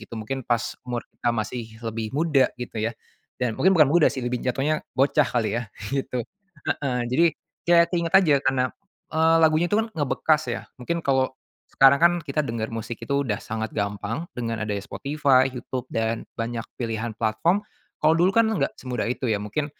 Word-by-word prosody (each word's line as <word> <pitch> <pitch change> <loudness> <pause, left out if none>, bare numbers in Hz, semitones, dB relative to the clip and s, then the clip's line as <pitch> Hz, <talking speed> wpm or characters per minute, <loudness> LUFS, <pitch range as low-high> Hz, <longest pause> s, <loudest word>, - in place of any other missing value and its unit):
gitu, 115 +1 -10
mungkin 125 +4 -5
pas 120 -2 -1
umur 120 -1 -3
kita 120 -1 -1
masih 110 +2 -3 0.2
lebih 115 +2 -4
muda 150 -4 +2
gitu 125 -2 -6
ya 115 +1 -1 0.5
dan 115 -3 -1
mungkin 190 +1 +4
bukan 150 -4 +5
muda 170 -1 +5
sih, 130 - -1
lebih 125 0 -1
jatuhnya 145 +5 +1 0.2
bocah 140 +1 +3
kali 120 -1 0
ya 120 - -5 0.2
gitu, 130 -3 -2 0.5
heeh 130 -4 -1
jadi 165 +7 +4 0.4
ya 170 0 +6
keingat 170 0 -1
aja 160 -8 +6
karena 130 -1 +2 0.5
eee, 160 +1 +4
lagunya 160 +2 +4
itu 205 - -1
kan 225 - -7
ngebekas 155 - +1
ya, - - -5 0.2
mungkin 170 +7 -2
kalau 130 -1 +1 0.4
sekarang 135 +1 +7
kan 170 +2 +6
kita 150 0 -5
denger 115 -2 -3
musik 115 +1 -6
itu 140 +3 0
udah 105 -1 -2
sangat 110 -1 -4
gampang 105 - -3
dengan 115 -2 -3
adanya 105 -1 -2
Spotify, 140 -2 +2
Youtube 125 0 -5
dan 115 0 -1 0.2
banyak 115 0 -2 0.2
pilihan 115 -1 -2
platform. 165 - +1 0.3
Kalau 155 +1 +4
dulu 175 +3 +4
kan 230 +2 +4
enggak 220 -3 0
semudah 125 -3 -3
itu 125 +1 -2
ya 105 -3 0
mungkin 145 +8 -2
130 Hz, 180 wpm, -24 LUFS, 115-155 Hz, 0.5 s, sekarang